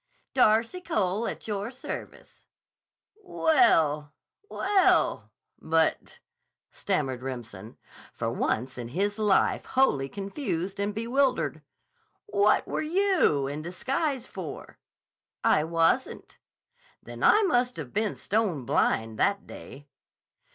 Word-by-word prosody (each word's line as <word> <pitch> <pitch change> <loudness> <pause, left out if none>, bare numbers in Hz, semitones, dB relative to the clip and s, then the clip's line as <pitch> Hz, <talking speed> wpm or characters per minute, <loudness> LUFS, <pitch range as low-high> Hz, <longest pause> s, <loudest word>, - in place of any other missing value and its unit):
"Darcy 230 +7 +3
Cole, 215 - -1
at - - -6
your 205 0 -3
service." 255 +1 -9 0.8
"Well—well, 320 - +1 0.3
but," 160 0 0 0.5
stammered 130 -2 -2
Remsen, 115 -5 -7 0.3
for - - -3
once 125 +2 -2
in 120 - -5
his 200 - -2
life 210 -3 +2
wholly 145 - +1
confused 195 - -4
and 205 +1 -2
bewildered. 250 +4 0 0.6
"What 210 - +2
were - - -2
you 335 - +2
in 145 +2 -4
disguise 265 - -2
for?" 180 - -9 0.6
"I 150 - +4
wasn't." 165 +10 0 0.6
"Then - - -10
I 430 - +6
must 250 -9 +1
have 145 -6 -7
been 215 -1 0
stone 195 - -1
blind 110 -1 0
that 200 0 +1
day!" 145 +2 -12
200 Hz, 100 wpm, -27 LUFS, -, 0.8 s, I